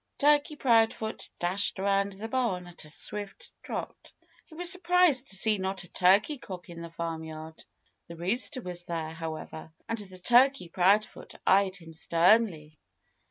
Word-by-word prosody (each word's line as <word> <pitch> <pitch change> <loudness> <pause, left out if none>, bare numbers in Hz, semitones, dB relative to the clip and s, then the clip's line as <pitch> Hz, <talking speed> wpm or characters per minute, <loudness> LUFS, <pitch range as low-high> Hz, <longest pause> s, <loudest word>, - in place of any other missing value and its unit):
Turkey 295 +1 +3
Proudfoot 225 -4 +1
dashed 180 +4 -1
around 200 +1 +1
the 205 +3 -6
barn 225 -7 -1
at 175 -2 -12
a - - -13
swift 205 +6 -5
trot. - - -7 0.4
He 315 - -15
was 350 +1 +1
surprised 355 -7 +3
to 195 - -4
see 210 +1 +2
not 190 +1 -3
a 175 - -14
turkey 200 +10 +3
cock 180 -6 -9
in 170 0 -9
the 170 - -7
farmyard. 160 -1 -6 0.4
The 170 - -9
rooster 240 - 0
was 175 -1 -5
there, 160 -2 -4
however. 160 -1 -7 0.2
And 195 -5 -6
Turkey 250 -5 +4
Proudfoot 195 +5 +1
eyed 195 -1 +4
him 165 -4 -13
sternly. 165 -2 +2
195 Hz, 150 wpm, -28 LUFS, 170-230 Hz, 0.4 s, Turkey